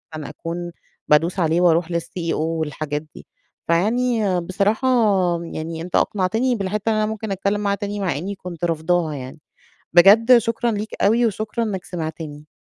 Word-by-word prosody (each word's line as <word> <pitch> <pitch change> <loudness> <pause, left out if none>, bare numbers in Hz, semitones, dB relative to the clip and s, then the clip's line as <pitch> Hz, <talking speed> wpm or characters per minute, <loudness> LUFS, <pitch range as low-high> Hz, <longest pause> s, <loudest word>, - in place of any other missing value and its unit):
أكون 165 +3 -6 0.4
بادوس 165 +5 +3
عليه 165 0 +2
وأروح 170 -1 +3
للCEO 170 0 -3
والحاجات 155 -2 -2
دي. - - -12 0.4
فيعني 215 +2 +1
بصراحة 200 +7 0 0.6
يعني 160 0 -5
أنت 175 +1 -5
أقنعتني 220 +6 +1
بالحتّة 205 +1 -2
إن 220 - +2
أنا 215 0 +1
ممكن 220 -1 -4
أتكلّم 200 +2 -1
معاه 200 -1 +1
تاني، 205 0 -4
مع 185 -7 -1
إنّي 195 +6 -4
كنت 175 -3 -5
رافضاها 165 0 0
يعني. 130 +2 -8 0.5
بجد 220 +8 +7
شكرًا 230 +1 -1
ليك 215 0 -4
أوي، 230 +4 +4
وشكرًا 215 +2 -2
إنّك 195 -4 -4
سمعتني. 155 -3 -6
180 Hz, 150 wpm, -21 LUFS, 165-215 Hz, 0.6 s, بجد